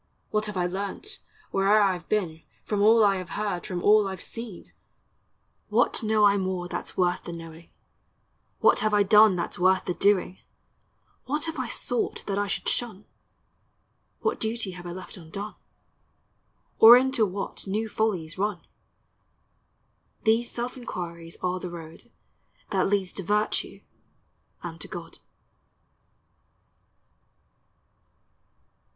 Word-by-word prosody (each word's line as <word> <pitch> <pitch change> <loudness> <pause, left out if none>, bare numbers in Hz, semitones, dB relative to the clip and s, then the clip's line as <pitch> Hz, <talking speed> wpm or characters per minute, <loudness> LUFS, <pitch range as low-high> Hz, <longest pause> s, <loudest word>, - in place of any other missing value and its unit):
What 215 0 0
have 210 -2 -5
I 180 - +1
learnt, 200 - -5 0.3
where'er 195 +2 +4
I 195 -3 +2
've 170 - -23
been, 175 -7 -1 0.2
From 205 -2 -1
all 220 +1 +6
I 200 -1 +3
have 185 -1 -7
heard, 205 -4 -2
from 180 -2 -4
all 210 -1 +5
I 190 - -4
've 185 - -13
seen? 225 -5 -8 1.0
What - - +2
know 215 -1 +2
I 200 0 +5
more 185 -2 -2
that - - -4
's - - -11
worth 180 -1 +1
the - - -5
knowing? 165 0 -10 0.9
What - - +5
have 215 -1 +1
I 205 - +5
done 210 0 +6
that 170 - -3
's - - -7
worth 185 +1 +3
the 180 - -1
doing? 190 -1 +1 0.9
What 295 +4 -1
have 325 -3 -4
I 255 - -2
sought 245 +1 -2
that 200 0 -1
I 205 - 0
should 200 - -3
shun? 220 -5 -2 1.2
What - - 0
duty 220 -3 -2
have 175 -1 -9
I - - -5
left 185 +2 -8
undone? 195 +5 -7 1.3
Or 230 +2 +11
into 260 -2 +2
what 195 0 -4
new 215 +3 -1
follies 190 -7 -2
run? 200 -4 -2 1.6
These 225 +2 +2
self 245 +1 -4
inquiries 170 -8 -7
are 180 0 0
the 180 - -6
road 165 -2 -11 0.6
That - - +1
leads 195 -2 0
to 195 - -5
virtue 210 +4 -1 0.8
and - - -7
to - - -4
God. - - -8
200 Hz, 145 wpm, -26 LUFS, 180-215 Hz, 1.6 s, Or